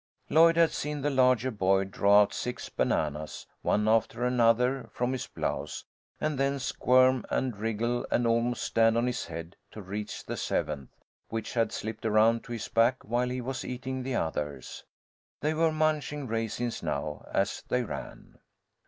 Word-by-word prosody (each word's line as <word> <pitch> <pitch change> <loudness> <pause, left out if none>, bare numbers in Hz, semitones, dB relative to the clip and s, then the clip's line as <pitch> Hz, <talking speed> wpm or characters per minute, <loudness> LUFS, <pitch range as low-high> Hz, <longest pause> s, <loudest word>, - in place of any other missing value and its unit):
Lloyd 165 +1 +6
had 165 -1 +5
seen 150 0 -3
the 145 +2 0
larger 130 -1 +3
boy 95 -2 +2
draw 100 +1 +5
out 100 - -5
six 125 0 -4
bananas, 75 0 -1 0.2
one 105 +1 +1
after 115 +2 +2
another, 125 +1 +2
from 125 +1 -1
his 130 - -3
blouse, - - -3 0.4
and 150 -3 -1
then 140 0 +1
squirm 130 -1 +3
and 130 -4 -1
wriggle 115 +3 -1
and 120 - +1
almost 115 +1 +1
stand 115 0 +3
on 120 - +2
his 125 -4 -2
head 85 +1 -7
to - - -10
reach 105 +2 -6
the - - -4
seventh, 70 -4 -2 0.4
which 115 -1 -4
had 115 -3 +1
slipped 110 0 -5
around 110 +1 +3
to - - -10
his 115 -3 -4
back 115 +3 +2
while 120 +3 0
he 125 0 -3
was 130 +2 -4
eating 130 +1 -4
the 130 0 -3
others. 75 - -3 0.6
They 150 +2 +1
were 160 +1 +2
munching 155 -2 0
raisins 115 +1 -2
now, 75 +1 -3
as 100 +2 0
they 125 0 +1
ran. - - -8
120 Hz, 165 wpm, -29 LUFS, 105-130 Hz, 0.6 s, Lloyd